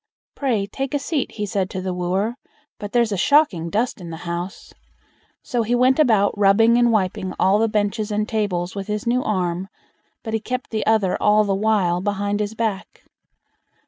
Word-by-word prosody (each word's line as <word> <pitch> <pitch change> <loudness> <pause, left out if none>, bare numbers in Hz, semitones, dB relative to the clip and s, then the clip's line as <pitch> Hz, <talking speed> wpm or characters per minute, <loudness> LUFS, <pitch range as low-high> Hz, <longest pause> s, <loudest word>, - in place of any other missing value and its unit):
"Pray, 235 -8 0
take 270 +7 -4
a - - +3
seat", 285 -1 -2
he 210 - -3
said 195 -2 -2
to 185 - -5
the 185 0 -3
wooer; 185 +5 -1 0.5
"but 205 -1 -6
there's 235 -2 +2
a 200 - -1
shocking 190 - +3
dust 220 +2 -1
in 170 - -8
the 165 - -6
house." 175 +3 -5 0.7
So 245 -2 -1
he 230 +2 0
went 255 +3 +3
about 220 -9 +3
rubbing 210 +3 +4
and 240 -1 +4
wiping 190 -3 -1
all 195 +2 +4
the 225 - +3
benches 210 0 -1
and 210 0 -1
tables 185 -5 -2
with 195 -1 -6
his 210 -1 -3
new 245 +2 +1
arm, 185 -4 -2 0.6
but 220 - -5
he 220 - +1
kept 250 +3 -5
the 215 -2 -1
other 215 -4 +2
all 210 +1 +4
the 200 -1 0
while 195 -4 +1
behind 205 +1 -1
his 210 +1 -3
back. 220 -4 -3
210 Hz, 190 wpm, -21 LUFS, 190-225 Hz, 0.7 s, rubbing